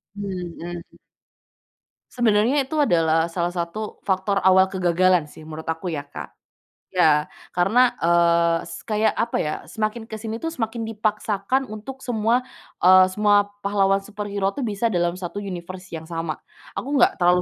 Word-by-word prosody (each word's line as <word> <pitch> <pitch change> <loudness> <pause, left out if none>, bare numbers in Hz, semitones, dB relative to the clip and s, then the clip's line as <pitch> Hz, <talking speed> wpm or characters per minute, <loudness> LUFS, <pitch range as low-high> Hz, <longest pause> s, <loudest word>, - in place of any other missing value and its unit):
Hmm. 175 -3 -5 1.3
Sebenarnya 240 +4 +2
itu 290 - -10
adalah 165 - +2
salah 175 0 -2
satu 180 +5 -4
faktor 195 +1 0
awal 190 0 +6
kegagalan, 180 -3 +2
sih, 155 - -13
menurut 160 +1 -7
aku, 165 +1 -3
ya, 145 - -2
Kak. 145 0 -9 0.6
Ya, 155 -4 +3 0.3
karena, 220 +8 +3
eee, 170 0 +4
se - - -8
kayak 215 0 +1
apa, 235 - 0
ya, 150 - -2
semakin 220 +1 -3
ke 225 - -13
sini, 220 +1 -5
tuh, 325 +5 -4
semakin 225 -3 -3
dipaksakan 215 +3 -1
untuk 220 +5 -8
semua, 235 +1 +1 0.4
eee, 185 0 +8
semua 205 +1 +3 0.2
pahlawan 195 -1 +3
superhero, 200 -1 -3
tuh, 280 - -5
bisa 225 -1 -1
dalam 175 0 0
satu 185 +2 -5
universe 185 -1 -7
yang 160 -1 -7
sama. 165 -2 -4 0.4
Aku 280 +3 -3
enggak - - +4
terlalu 180 0 +4
195 Hz, 150 wpm, -23 LUFS, 170-215 Hz, 1.3 s, eee